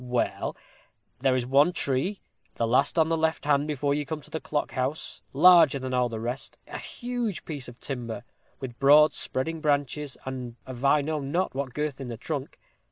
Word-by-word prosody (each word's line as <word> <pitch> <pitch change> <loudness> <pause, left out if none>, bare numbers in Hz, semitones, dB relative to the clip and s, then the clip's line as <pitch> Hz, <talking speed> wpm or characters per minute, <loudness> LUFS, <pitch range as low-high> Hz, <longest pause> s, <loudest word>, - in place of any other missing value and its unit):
Well, 125 -1 -1 0.6
there 130 0 +3
is 125 -2 0
one 140 +7 +4
tree 155 +7 -1 0.3
the 115 - 0
last 130 +8 +2
on 160 0 +4
the 165 - +2
left 160 -1 0
hand 145 0 +3
before 145 -1 0
you 145 +1 0
come 155 +2 -4
to - - -13
the 160 - -2
clock 150 - -2
house 130 +4 -2
larger 165 -1 +7
than 130 -1 -4
all 125 -1 +2
the 115 -1 -4
rest 120 +4 -4
a - - -6
huge 240 -5 -4
piece 145 -6 -5
of 120 0 -12
timber, 120 -3 -5 0.4
with 125 -2 -7
broad 150 +2 +7
spreading 160 +5 -3
branches, 145 -1 0
and 125 -3 -5
of 130 -1 -8
I 140 +2 +5
know 155 +1 -2
not 155 +7 -1
what 135 -2 -4
girth 150 -2 -2
in 135 - -5
the 120 -2 -5
trunk. - - -5
140 Hz, 195 wpm, -27 LUFS, 130-155 Hz, 0.6 s, larger